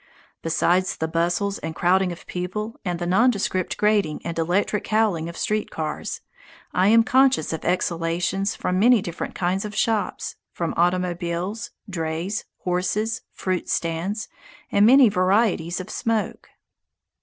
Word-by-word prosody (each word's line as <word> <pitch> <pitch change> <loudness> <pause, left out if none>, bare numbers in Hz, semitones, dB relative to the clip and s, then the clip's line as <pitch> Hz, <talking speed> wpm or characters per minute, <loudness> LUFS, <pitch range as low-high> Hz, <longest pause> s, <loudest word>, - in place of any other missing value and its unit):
Besides 180 +3 +1
the 160 - -1
bustle 175 +5 0
and 160 0 -5
crowding 185 +1 +2
of 170 - -9
people 210 +5 -4
and 175 -2 -2
the 175 - -3
nondescript 190 -1 +1
grating 210 -7 +2
and 165 -1 -3
electric 190 +5 0
howling 210 -7 +1
of 170 - -9
street 215 -4 -1
cars, 155 -1 -4 0.5
I 185 +1 +3
am 230 +2 +6
conscious 260 - +3
of 160 - -4
exhalations 175 +2 0
from 180 0 -1
many 235 -1 +5
different 170 -1 -5
kinds 185 +2 0
of 210 -1 -6
shops; 220 -1 -1
from 170 -1 -3
automobiles, 175 +3 -1 0.2
drays, 170 +2 -3 0.2
horses, 195 +5 -1
fruit 185 -2 -3
stands, 175 +6 -2 0.4
and 200 +1 +5
many 265 +1 +8
varieties 185 -3 +2
of 185 - -7
smoke. 225 -2 -2
185 Hz, 135 wpm, -23 LUFS, 170-210 Hz, 0.5 s, many